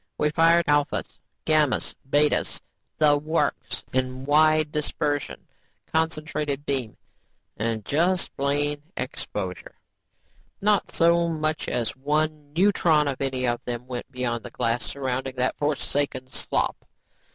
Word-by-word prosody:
We 150 - +1
fired 165 +2 +4
alphas, 145 -1 0 0.3
gammas, 155 -4 +2 0.2
betas, 145 +1 +2 0.4
the 150 -1 +5
works, 155 -1 -1
in 130 0 -1
wide 155 +1 +4
dispersion, 150 -1 -2 0.5
concentrated 155 -3 -1
beam 130 -6 -1 0.6
and 110 -1 -2
just 175 +5 +1
plain 145 +1 0 0.2
exposure. - - -5 0.8
"Not 210 0 +2
so 170 0 +3
much 155 -1 -1
as 115 -3 -1
one 150 +1 -1
neutron 165 -4 +3
of 140 -1 -3
any 130 -2 0
of 120 -1 -1
them 120 0 -4
went 125 +1 -6
beyond 120 -3 -2
the 125 - -7
glass 115 +1 -1
surrounding 130 -1 -3
that 125 0 +1
forsaken 145 -3 -1
slop. - - -1
145 Hz, 120 wpm, -25 LUFS, 130-155 Hz, 0.8 s, the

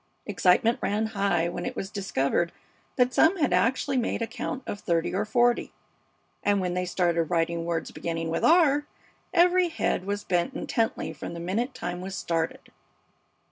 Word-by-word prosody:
Excitement 220 +6 +3
ran 210 +2 0
high 195 -5 +1
when 175 0 -4
it - - -4
was 195 - -5
discovered 170 -4 0 0.4
that 250 0 +2
some 335 +5 +4
had 295 -6 +1
actually 260 +3 +1
made 235 -1 0
a - - +1
count 245 +3 -5
of 205 - -5
thirty 170 -3 0
or 195 - 0
forty, 240 +2 +2 0.7
and 205 -1 +3
when 180 -1 -1
they 180 0 -1
started 175 -2 +1
writing 165 0 0
words 170 -1 -2
beginning 165 -1 -3
with 165 - -1
R 295 -4 +4 0.4
every 360 0 +4
head 250 - -1
was 205 +1 -2
bent 180 +8 0
intently 225 -1 -1
from 170 - -7
the - - -6
minute 225 +10 -2
time 175 0 -4
was 190 +1 -5
started. 165 -3 -3
195 Hz, 170 wpm, -27 LUFS, 170-245 Hz, 0.7 s, some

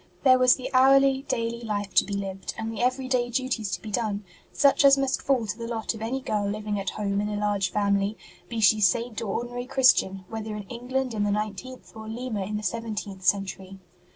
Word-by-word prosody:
There 255 -2 +6
was 255 0 +6
the 260 +1 -7
hourly, 270 +1 +5
daily 230 0 -2
life 205 -3 -3
to - - +5
be 200 - -4
lived, 195 -1 -5
and 225 0 -4
the 220 - -4
everyday 255 -1 0
duties 245 -4 -1
to - - -3
be 215 - -6
done, 210 -2 -2 0.3
such 280 0 +3
as 275 0 +7
must 270 -1 0
fall 260 -5 +1
to 210 - -3
the 230 0 -6
lot 230 -1 -2
of 220 - -10
any 250 +4 -2
girl 210 -5 -1
living 210 0 -3
at 195 - -2
home 200 -1 -2
in 210 - -2
a 210 - -3
large 205 -2 0
family 200 0 +1 0.3
be 230 - -3
she 215 +1 +5
Saint 230 +4 +1
or 225 - -4
ordinary 245 +3 -4
Christian 195 -8 +3
whether 220 0 -5
in 210 - -5
England 250 +1 -3
in 210 -2 -1
the 205 - +1
nineteenth 210 +5 -4
or 220 0 -9
Lima 225 -3 -3
in 210 +2 -3
the 210 - -6
seventeenth 210 -2 -4
century. 195 0 -1
220 Hz, 215 wpm, -26 LUFS, 205-250 Hz, 0.3 s, as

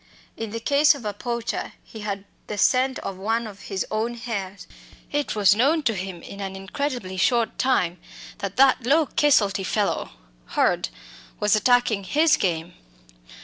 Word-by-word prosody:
In 225 -1 -5
the 230 +2 -4
case 285 +5 +4
of 255 -6 -10
a 210 - -2
poacher 235 +2 -3
he 220 - -11
had 200 -1 -4 0.2
the 210 - -4
scent 255 +5 +3
of 190 - -4
one 225 +4 -1
of 205 -2 -9
his 195 -2 -2
own 225 +2 -1
hares. 200 -5 -5 0.5
It 290 -5 -1
was 200 -3 +5
known 285 +9 +2
to 230 - +2
him 185 -3 -6
in 200 - -9
an 190 -1 -4
incredibly 195 0 -4
short 235 +1 +1
time 180 -10 +1 0.4
that 200 0 -5
that 265 -1 +5
"low 310 +4 +4
caselty 205 -11 +2
fellow 205 +2 -1 0.5
Hurd" - - +2 0.5
was 210 +1 +3
attacking 220 -2 +2
"his" 305 - +4
game. 170 -1 -2
215 Hz, 160 wpm, -24 LUFS, 195-255 Hz, 0.5 s, was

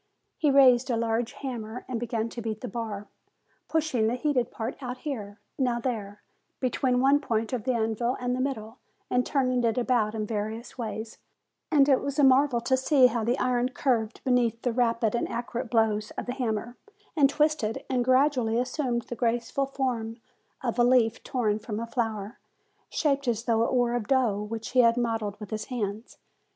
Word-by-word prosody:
He 300 - +3
raised 260 -2 +6
a 235 - +1
large 230 +1 -1
hammer 240 -4 -6
and 245 -3 -3
began 230 -1 -2
to 235 - -7
beat 220 -1 -4
the 250 - -4
bar, 220 -4 -5 0.6
pushing 305 -9 +1
the 235 - 0
heated 250 -2 0
part 230 +5 -5
now 250 -1 -4
here, 225 -7 -6 0.2
now 245 -3 +1
there, 210 -5 -4 0.4
between 255 0 +1
one 275 +2 +4
point 225 -4 -2
of 245 -3 -2
the 260 - +2
anvil 230 +2 0
and 250 0 -1
the - - -4
middle, 240 -4 -4 0.3
and 250 0 +3
turning 255 -3 +1
it 230 0 +1
about 235 -3 +1
in 215 -1 -2
various 220 +2 -4
ways; 220 -2 -5 0.5
and 285 -4 +5
it 270 -3 +4
was 280 -1 -3
a 290 - +4
marvel 265 -1 +5
to 260 +2 +2
see 260 0 +4
how 235 -2 +2
the 240 +4 +1
iron 250 -1 +1
curved 240 -5 -1
beneath 240 -3 +1
the 245 - 0
rapid 230 -2 +1
and 235 - -1
accurate 240 +1 -4
blows 220 -2 +1
of - - -3
the 245 - -3
hammer, 240 -2 -3 0.4
and 285 -4 +5
twisted, 290 -5 0
and 250 -2 +1
gradually 255 -3 +3
assumed 250 -1 -1
the 240 - -7
graceful 240 +3 0
form 245 -5 -2 0.5
of 240 -1 -2
a - - +6
leaf 240 -2 +3
torn 220 -6 0
from 215 0 -5
a 230 - -3
flower, 225 -3 -3 0.5
shaped 280 -3 0
as 230 -1 0
though 230 -2 +2
it 230 - +1
were 245 -1 +2
of 240 -4 -2
dough 240 -6 +2
which 220 +1 -5
he 255 - +2
had 230 -1 +5
modelled 225 -4 -1
with 210 0 -9
his 215 0 -3
hands. 220 -2 -4
240 Hz, 190 wpm, -27 LUFS, 225-255 Hz, 0.6 s, raised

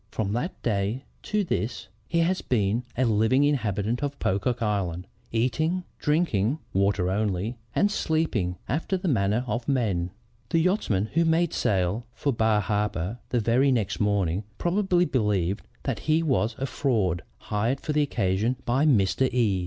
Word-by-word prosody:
From 105 -3 -2
that 150 - -3
day 105 +3 0 0.2
to 210 -1 0
this, 115 - -2 0.2
he 170 0 +1
has 180 +3 +1
been 110 0 0
a 130 - +3
living 110 +5 +3
inhabitant 115 -5 0
of 145 -1 -2
Pocock 115 +6 0
Island, 95 -5 -1 0.3
eating, 155 +10 0 0.2
drinking, 150 - +1 0.2
(water 95 -1 +2
only) 105 +3 -1 0.2
and 205 - +3
sleeping 155 - 0
after 165 - -1
the 185 +1 -4
manner 110 - +2
of 120 0 -3
men. 100 -10 +1 0.4
The - - +2
yachtsmen 160 - +1
who 165 +2 +3
made 165 0 +2
sail 100 +4 0
for 140 - 0
Bar 110 -2 +2
Harbor 105 +1 -1
the 125 - +1
very 120 +5 +3
next 100 -8 0
morning, 100 -2 +1
probably 180 0 +2
believe 105 - 0 0.2
that - - -2
he 155 +1 +2
was 125 -7 +1
a 135 - -2
fraud 110 - 0 0.2
hired 115 +6 -1
for 150 - -3
the 150 - +3
occasion 110 -3 +1
by 135 +6 +2
Mr. 125 +1 +3
E 110 -7 +2
115 Hz, 155 wpm, -26 LUFS, 100-145 Hz, 0.4 s, a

